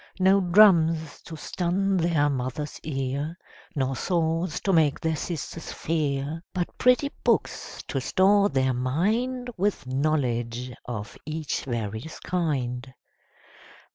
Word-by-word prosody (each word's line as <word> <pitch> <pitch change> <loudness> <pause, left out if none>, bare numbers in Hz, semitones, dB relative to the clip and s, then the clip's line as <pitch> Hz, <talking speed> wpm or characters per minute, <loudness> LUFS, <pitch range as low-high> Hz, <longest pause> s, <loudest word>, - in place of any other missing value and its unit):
No 190 +1 +5
drums 170 -5 +4
to 165 - -7
stun 185 +5 0
their 165 -4 +2
Mother's 135 +2 -3
ear, 140 +3 -3 0.4
Nor 135 -2 0
swords 165 +1 0
to 195 - +1
make 155 -4 +3
their 160 -1 0
sisters 165 0 -5
fear; 150 -1 -1
But 175 -1 -2
pretty 250 +3 +4
books - - 0
to - - -1
store 200 +1 +4
their 130 -4 +1
mind 220 - 0
With 200 -4 0
knowledge 125 -3 -1 0.2
of 110 -3 -5
each 155 -1 -3
various 115 +3 -4
kind. 135 -8 -2
155 Hz, 115 wpm, -26 LUFS, 130-180 Hz, 0.4 s, No